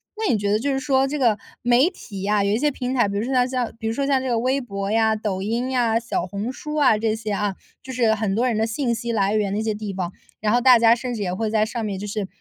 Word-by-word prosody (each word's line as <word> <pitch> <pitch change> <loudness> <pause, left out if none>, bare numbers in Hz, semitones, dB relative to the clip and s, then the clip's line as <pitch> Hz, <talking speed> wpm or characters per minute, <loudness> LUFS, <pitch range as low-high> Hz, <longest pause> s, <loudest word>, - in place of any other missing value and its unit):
那 435 -1 0
你 225 - +2
觉 200 0 -1
得 210 - +2
就 280 +5 -1
是 270 - 0
说 270 0 +2
这 295 +2 -3
个 235 -6 +3 0.3
媒 245 +6 +4
体 200 - -9
啊， 205 0 +2
有 200 - +1
一 210 - +2
些 295 +5 +2
平 255 -2 -3
台， 240 -5 +3
比 200 - -3
如 205 - -1
说 260 +3 -2
像 250 -1 +3
像 250 -2 -2
比 225 - -3
如 225 - 0
说 275 +4 -1
像 275 -1 +2
这 260 - -3
个 235 - +1
微 260 +3 0
博 200 -4 -4
呀， 220 0 +3
抖 210 -3 -3
音 235 +6 -1
呀， 235 -3 +2
小 230 -6 -2
红 205 +7 -4
书 300 +3 -6
啊 280 -8 +4
这 220 0 0
些 220 -1 -5
啊， 205 -1 -1 0.3
就 260 - -9
是 235 -3 +2
很 210 -3 -1
多 240 +4 +2
人 240 - 0
的 220 +1 +1
信 235 +1 -1
息 235 +1 -3
来 205 -2 +1
源 205 -2 0
的 200 - -1
一 - - -1
些 220 -1 0
地 210 -1 -5
方， 185 -2 -4 0.3
然 210 0 +1
后 245 - +3
大 255 -1 +7
家 230 0 +6
甚 245 +1 -4
至 215 - -5
也 180 -2 -2
会 220 +3 -2
在 215 0 +2
上 230 +1 -4
面 205 -3 -3
就 200 - -5
是 210 -1 -3
225 Hz, 335 characters per minute, -22 LUFS, 210-255 Hz, 0.3 s, 大